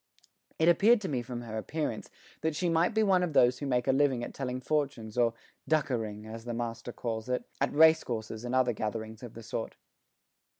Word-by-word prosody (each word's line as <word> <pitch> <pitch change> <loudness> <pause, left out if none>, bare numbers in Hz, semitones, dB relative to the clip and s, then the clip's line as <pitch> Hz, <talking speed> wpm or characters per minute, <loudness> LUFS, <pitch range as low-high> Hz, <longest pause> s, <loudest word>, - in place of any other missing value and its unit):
It 160 - +2
appeared 210 +7 +6
to 190 - -3
me 135 -7 -1
from 120 0 -6
her 110 -2 -5
appearance 145 -3 -3 0.3
that 160 -1 0
she 175 +2 0
might 165 +6 +2
be 220 - +4
one 190 -3 +4
of 175 -4 -1
those 125 -2 +4
who 145 - -3
make 125 -1 0
a - - +5
living 135 -3 +2
at - - -6
telling 130 -2 -3
fortunes 130 -6 -2
or 120 -1 +2 0.3
"dukkering," 115 -9 0
as 115 +1 -8
the 120 -1 -4
master 115 0 -4
calls 115 -1 -4
it, 125 - 0 0.2
at 140 - +2
racecourses 120 -8 +3
and 125 +1 -2
other 125 -2 +3
gatherings 110 0 -4
of 120 -3 -9
the 115 - -9
sort. - - -4
125 Hz, 205 wpm, -30 LUFS, 115-155 Hz, 0.3 s, appeared